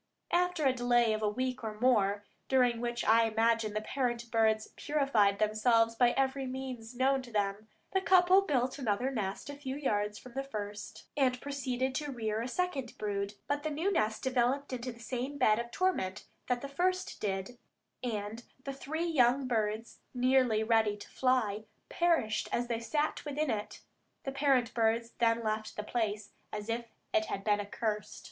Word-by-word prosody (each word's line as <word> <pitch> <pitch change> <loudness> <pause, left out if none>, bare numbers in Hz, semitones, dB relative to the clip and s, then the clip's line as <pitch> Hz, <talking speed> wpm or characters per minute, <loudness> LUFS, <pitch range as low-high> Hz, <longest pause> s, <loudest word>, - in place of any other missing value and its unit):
After 360 -3 +2
a 265 - +5
delay 240 -2 +3
of 215 - -2
a 210 - +2
week 255 +3 -2
or 215 -1 -5
more, 205 -5 +3 0.2
during 245 -3 +3
which 240 0 -2
I 230 +1 +5
imagine 225 -1 +2
the 215 - -1
parent 240 -1 -2
birds 220 -1 +2
purified 255 -9 +2
themselves 225 +2 +3
by 240 +1 +4
every 270 0 0
means 255 -3 -6
known 265 +2 +2
to 245 -2 -12
them, 205 0 -1 0.2
the 380 - +2
couple 370 +1 +6
built 260 -6 0
another 245 +1 0
nest 205 -4 -3
a 285 - -5
few 270 -2 -5
yards 210 -7 -1
from 250 - -12
the 270 - -1
first, 210 -6 -6
and 255 -3 +2
proceeded 260 -2 -2
to 295 +1 -3
rear 220 -3 -2
a 235 - -3
second 275 -4 -2
brood; 200 -1 -2
but 285 0 0
the 310 - -2
new 320 +7 0
nest 220 - 0
developed 260 +2 +1
into 250 0 -3
the 235 - -14
same 255 +4 -4
bed 215 -4 +4
of 235 0 -4
torment 240 - -1 0.2
that 245 -1 0
the 280 - -4
first 370 +6 -1
did, 195 +4 -3 0.4
and 220 -1 -3 0.2
the 275 - -4
three 315 +5 -3
young 265 -4 +3
birds, 220 -1 -1 0.2
nearly 250 -3 +3
ready 220 -2 +2
to 205 - -11
fly, 220 -5 +1 0.2
perished 330 -11 +1
as 240 - 0
they 230 -1 0
sat 295 +6 -1
within 295 0 -1
it. 210 -1 -4 0.4
The 270 - -3
parent 270 -4 +2
birds 230 0 +1
then 230 -1 +3
left 215 0 -2
the 210 - -4
place 215 -2 -2 0.2
as 210 +1 -5
if 235 +1 -2 0.3
it 220 - +3
had 195 - -4
been 210 -1 +2
accursed. 210 0 -3
240 Hz, 180 wpm, -32 LUFS, 215-270 Hz, 0.4 s, couple